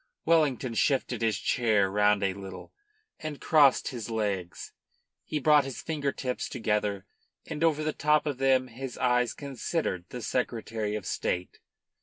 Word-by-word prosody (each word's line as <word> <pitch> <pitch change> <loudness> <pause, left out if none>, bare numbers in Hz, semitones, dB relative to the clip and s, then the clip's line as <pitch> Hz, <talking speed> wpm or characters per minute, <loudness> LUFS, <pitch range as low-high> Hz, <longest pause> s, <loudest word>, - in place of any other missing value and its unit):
Wellington 145 -7 +2
shifted 125 -1 +1
his 115 -2 +1
chair 110 -5 +2
round 105 0 +3
a 95 -1 +1
little, 95 -1 -9 0.5
and 155 -2 -6
crossed 145 -4 +4
his 115 -4 -6
legs. 100 -6 -3 0.5
He 155 - -3
brought 150 0 +5
his 135 -2 -6
finger 145 -3 -1
tips 125 -2 -3
together, 105 -4 -1 0.4
and 150 - -4
over 155 -2 +2
the 155 0 -1
top 150 +1 +2
of 145 -4 -3
them 130 -1 +3
his 125 +2 -7
eyes 125 -1 +2
considered 135 - -3
the 125 -2 -7
Secretary 110 -4 -2
of 105 - -5
State. 90 0 -2
125 Hz, 150 wpm, -28 LUFS, 105-140 Hz, 0.5 s, brought